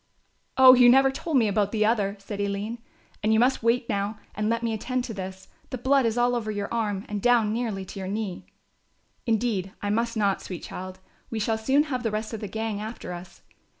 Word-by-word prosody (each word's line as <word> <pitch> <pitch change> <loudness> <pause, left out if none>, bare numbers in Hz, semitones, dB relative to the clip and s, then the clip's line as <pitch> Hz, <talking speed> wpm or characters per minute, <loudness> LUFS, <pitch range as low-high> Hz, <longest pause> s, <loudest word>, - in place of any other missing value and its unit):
"Oh, 260 -1 +10
you 245 -1 +7
never 270 +2 +6
told 300 +2 -1
me 230 -4 +4
about 205 0 +1
the 215 -1 +2
other," 205 -3 +1
said 200 +1 -6
Aline, 200 +3 -3 0.4
"and 215 - +1
you 220 - +4
must 255 +3 +3
wait 230 +1 +1
now 205 0 -2 0.2
and 210 +1 -1
let 230 +1 0
me 230 -1 0
attend 250 +3 -2
to 235 - -5
this; 190 -1 -7 0.2
the 255 - -4
blood 260 0 +3
is 225 +1 -1
all 245 0 +3
over 225 -3 -2
your 205 0 -3
arm 210 -4 -1
and 205 -1 -4
down 235 -3 +3
nearly 220 -5 -2
to 195 - -8
your 190 - -4
knee." 200 -2 -4 0.8
"Indeed, 215 -4 0
I 205 - -2
must 230 +1 0
not, 200 -2 +1
sweet 180 -3 -7
child, 185 0 -7 0.3
we 225 - -4
shall 220 +1 0
soon 270 +6 +3
have 265 -5 -3
the 230 - 0
rest 215 +1 -3
of 220 - -4
the 210 - -4
gang 220 +1 -3
after 215 -4 -6
us. 175 0 -11
220 Hz, 220 wpm, -26 LUFS, 200-240 Hz, 0.8 s, Oh